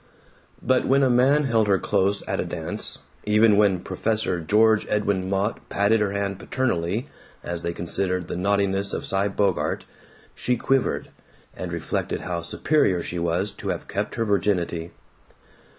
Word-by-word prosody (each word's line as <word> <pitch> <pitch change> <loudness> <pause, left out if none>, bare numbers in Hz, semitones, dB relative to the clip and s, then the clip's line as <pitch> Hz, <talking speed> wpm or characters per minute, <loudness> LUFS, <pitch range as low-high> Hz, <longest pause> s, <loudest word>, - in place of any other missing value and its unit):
But 130 -1 +2
when 135 +1 +4
a 130 - +4
man 135 +5 +4
held 115 -5 +2
her 100 -1 +4
close 100 +1 0
at - - -1
a - - +1
dance, - - -5 0.2
even 105 0 +5
when 100 -3 +3
"Professor" 95 -1 -1
George 110 +5 +3
Edwin 100 -3 0
Mott 100 +3 0
patted 105 +2 +2
her 100 -2 +1
hand 100 -1 -2
paternally 115 - -1 0.4
as 85 -1 -3
they 85 - -2
considered 90 +1 -2
the - - -4
naughtinesses 100 +1 +1
of - - -4
Cy 95 +1 +1
Bogart, 100 -2 0 0.5
she 125 -1 -1
quivered, 135 +2 0 0.4
and - - -5
reflected - - -2
how 85 -1 -3
superior 90 - +1
she 85 - -4
was 85 +4 0
to - - -9
have - - -3
kept 100 +2 -3
her 115 - 0
virginity. 90 -5 0
100 Hz, 155 wpm, -24 LUFS, 90-110 Hz, 0.5 s, even